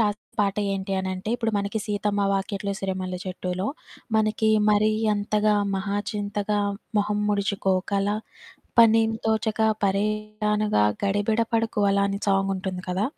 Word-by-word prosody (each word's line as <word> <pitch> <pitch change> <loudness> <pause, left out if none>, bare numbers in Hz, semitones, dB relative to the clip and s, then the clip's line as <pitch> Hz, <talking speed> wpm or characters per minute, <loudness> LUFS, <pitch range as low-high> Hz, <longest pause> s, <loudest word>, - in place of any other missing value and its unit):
రాసిన 210 -1 +1 0.2
పాట 200 -1 +1 0.2
ఏంటి 195 0 -3
అనంటే, 190 +1 -4
ఇప్పుడు 225 -2 -1
మనకి 200 +2 -2
'సీతమ్మ 205 -1 -1
వాకిట్లో 200 0 -2
సిరిమల్లె 185 -1 -3
చెట్టులో' 185 +1 -3 0.5
మనకి 220 0 +2 0.2
మరి 210 +1 +4 0.2
అంతగా 210 +1 +1 0.2
మహాచింతగా 205 +1 -2 0.4
మొహం 205 0 0
ముడుచుకోకలా, 200 0 0 0.6
పనేం 225 -1 +6
తోచక 220 0 0 0.2
పరేషానుగా 210 - 0 0.2
గడిబిడ 205 +3 +1
పడకు 225 -1 0
అలా, 200 0 +2
అని 200 0 -2
సాంగుంటుంది 195 -1 0
కదా! 185 +3 0
205 Hz, 115 wpm, -25 LUFS, 195-215 Hz, 0.6 s, పనేం